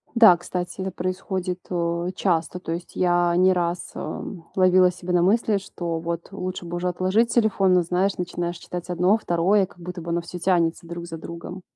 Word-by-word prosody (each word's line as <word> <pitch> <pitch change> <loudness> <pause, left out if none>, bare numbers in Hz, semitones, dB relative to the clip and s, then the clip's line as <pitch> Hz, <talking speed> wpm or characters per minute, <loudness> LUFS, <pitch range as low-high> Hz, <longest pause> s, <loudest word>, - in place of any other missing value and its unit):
Да, 220 -6 +8
кстати, 175 +1 -5
это 190 0 -2
происходит, 185 0 -3
э, 170 0 -1
часто, 175 -1 0
то 170 - -6
есть 170 +1 -5
я 175 -1 +2
не 185 +1 +5
раз, 175 -1 -2
э, - - -5 0.3
ловила 185 -1 +5
себя 180 0 -5
на 175 - +4
мысли, 210 +3 +3
что 175 -4 -4
вот 170 0 -4
лучше 185 -2 -5
бы 170 +1 -4
уже 180 +1 -1
отложить 185 +6 +1
телефон, 205 -5 +3
но, 180 - +5
знаешь, 180 +3 0
начинаешь 175 -1 -3
читать 175 +1 -7
1, 180 +4 +3
2, 190 +1 +2
как 180 - -20
будто 180 0 -7
бы 170 - -7
оно 170 +1 0
всё 175 +1 -8
тянется 170 -2 +1
друг 170 0 -6
за 165 -1 -7
другом. 170 +3 -8
180 Hz, 195 wpm, -24 LUFS, 170-185 Hz, 0.3 s, Да